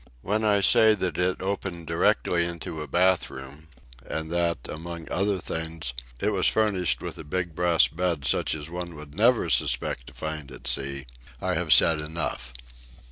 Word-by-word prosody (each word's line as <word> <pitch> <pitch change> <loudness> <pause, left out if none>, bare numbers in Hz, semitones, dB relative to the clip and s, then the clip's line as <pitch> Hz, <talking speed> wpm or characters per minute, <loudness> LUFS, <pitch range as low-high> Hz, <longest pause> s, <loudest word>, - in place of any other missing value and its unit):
When 105 +3 0
I 105 -2 +3
say 110 +2 +6
that 95 -3 -2
it 90 +1 0
opened 95 -3 -3
directly 85 +1 +2
into 85 -2 -5
a 75 - -6
bath 90 +1 +2
room, 70 +4 -10 0.4
and 80 +5 -4
that, 85 -1 +1
among 85 +1 -6
other 100 +1 +1
things, 80 -5 -4 0.3
it 105 - +1
was 95 -3 +2
furnished 105 -5 +1
with - - -6
a - - -6
big 85 +2 -3
brass 85 0 +4
bed 85 -4 -2
such 65 - +1
as 75 -1 -7
one 85 0 -6
would 75 -1 -11
never 115 +7 +3
suspect - - +1
to - - -11
find 75 -3 -5
at 65 - -11
sea, 70 0 -2 0.3
I - - -1
have - - -1
said 80 -2 +6
enough. 75 -5 -4
85 Hz, 175 wpm, -26 LUFS, 75-90 Hz, 0.4 s, say